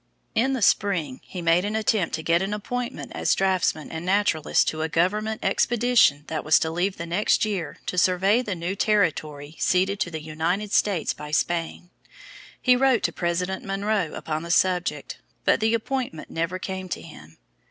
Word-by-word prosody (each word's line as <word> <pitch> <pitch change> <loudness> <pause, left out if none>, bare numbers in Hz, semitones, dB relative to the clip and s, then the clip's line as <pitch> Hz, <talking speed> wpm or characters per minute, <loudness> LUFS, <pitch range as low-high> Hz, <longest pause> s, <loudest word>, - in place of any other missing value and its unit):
In 260 +5 +2
the 255 -5 -1
spring 170 -13 +1
he 180 -2 -7
made 165 +2 +3
an 210 +2 -2
attempt 215 -4 +1
to 160 - -6
get 170 +2 +2
an 195 +2 -1
appointment 245 +4 -5
as - - +1
draughtsman 185 -5 0
and 160 0 -5
naturalist 185 -4 +2
to 155 - -4
a 160 - -1
government 210 +7 0
expedition 240 - +3
that 155 - -4
was 155 - +5
to 160 - 0
leave 185 +4 -1
the 170 - -5
next 180 +6 +1
year 195 -7 -3
to 180 - 0
survey 190 +6 +3
the 205 -6 -4
new 175 +3 -3
territory 155 -8 0
ceded 190 +2 +1
to 180 - -1
the 160 -2 -6
United 170 +7 -2
States 195 -6 +1
by 150 - -9
Spain. 170 +3 -2 0.7
He 250 -1 +4
wrote 255 -2 +3
to - - 0
President 180 +2 -2
Monroe 195 -3 -1
upon 155 0 -3
the 170 - -8
subject, 175 -5 0 0.3
but - - +4
the 220 +1 +2
appointment 240 -7 -4
never 165 +3 -2
came 190 0 -5
to - - -4
him. 80 - -13
185 Hz, 180 wpm, -24 LUFS, 165-210 Hz, 0.7 s, was